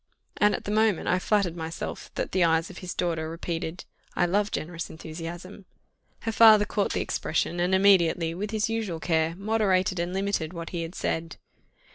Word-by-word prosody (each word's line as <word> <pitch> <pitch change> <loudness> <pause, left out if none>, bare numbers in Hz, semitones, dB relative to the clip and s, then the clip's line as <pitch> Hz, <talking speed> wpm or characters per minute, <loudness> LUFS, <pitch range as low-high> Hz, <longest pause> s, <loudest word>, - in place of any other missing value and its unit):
And 210 0 +4
at - - -6
the 205 - -4
moment 215 -4 +2
I 180 - +2
flattered 195 -4 +1
myself 165 0 -6
that - - -3
the 185 -1 +2
eyes 165 +1 +2
of 180 - -10
his 180 -1 -6
daughter 165 -2 -1
repeated 165 0 -4 0.3
"I 175 - +3
love 205 +4 +1
generous 170 -1 -4
enthusiasm," 170 +5 -8 0.6
her 225 - -2
father 220 -2 +7
caught 205 -1 -1
the - - 0
expression, 170 +2 -1
and 180 +2 +2
immediately, 175 -4 +4
with 200 +5 -4
his 215 -1 0
usual 220 -7 -2
care, 160 0 +1
moderated 195 -2 +1
and 175 +1 -1
limited 190 -4 -1
what 165 -1 -6
he 175 - -3
had 165 +2 -6
said. 165 -1 -2
180 Hz, 180 wpm, -27 LUFS, 165-200 Hz, 0.6 s, father